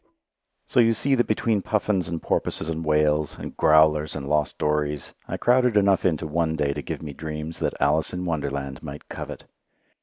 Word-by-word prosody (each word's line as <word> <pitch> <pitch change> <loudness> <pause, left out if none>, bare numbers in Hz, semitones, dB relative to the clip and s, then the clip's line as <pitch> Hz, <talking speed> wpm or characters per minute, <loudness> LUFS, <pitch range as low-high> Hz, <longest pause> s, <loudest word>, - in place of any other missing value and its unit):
So - - +1
you 115 -1 +5
see 135 +5 +1
that 120 -2 +2
between 110 -1 +1
puffins 100 -3 0
and 85 0 -3
porpoises 80 - -1
and 80 0 -3
whales, 75 -1 +1
and - - -8
"growlers" 75 0 +4
and 70 -2 -5
lost 75 0 0
dories, 75 -2 -1
I - - -3
crowded 125 -2 +3
enough 100 -2 +3
into 80 -5 +1
one 80 +1 0
day 70 -2 0
to 75 - -4
give - - -6
me 75 -2 -6
dreams 75 +2 -6
that - - -2
Alice 75 +3 +2
in 90 0 -4
Wonderland 70 -5 -3
might - - -9
covet. - - -7
80 Hz, 185 wpm, -24 LUFS, 75-95 Hz, -, you